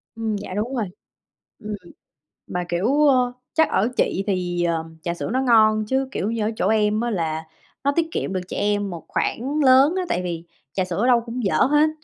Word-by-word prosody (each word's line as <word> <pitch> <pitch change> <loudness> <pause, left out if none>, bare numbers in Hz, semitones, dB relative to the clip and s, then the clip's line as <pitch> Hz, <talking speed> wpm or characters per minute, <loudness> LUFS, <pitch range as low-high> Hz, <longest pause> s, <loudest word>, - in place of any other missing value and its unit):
Ừm, 220 -2 -2
dạ 200 - -7
đúng 220 +7 -2
rồi. 225 -4 0 0.7
Ừm, 210 -1 -5 0.7
mà, 180 0 -2
kiểu, 255 +13 +2
ơ, 250 -2 +3 0.2
chắc 320 0 +3
ở 220 - +2
chị 195 - +1
thì, 175 -3 -1
ờm, 165 -1 -2
trà 170 - -1
sữa 170 - -5
nó 260 - +2
ngon, 215 -4 +4
chứ, 265 +1 0
kiểu 210 -2 -2
như, 230 -2 -1
ở 215 - 0
chỗ 190 - 0
em 215 0 +2
á 240 - -1
là 160 -4 -2 0.4
nó 280 - +3
tiết 330 -1 +2
kiệm 190 - -2
được 185 - -1
cho - - -5
em 205 -1 0
một 170 -3 -8
khoản 275 +6 -1
lớn 265 +6 +6
á, 370 - 0
tại 180 - 0
vì 170 -2 -4 0.3
trà 190 -1 0
sữa 180 -1 -4
ở 245 - +2
đâu 240 -2 +5
cũng 235 +1 -5
dở 195 - +1
hết. 295 +3 +4
215 Hz, 220 wpm, -23 LUFS, 185-255 Hz, 0.7 s, lớn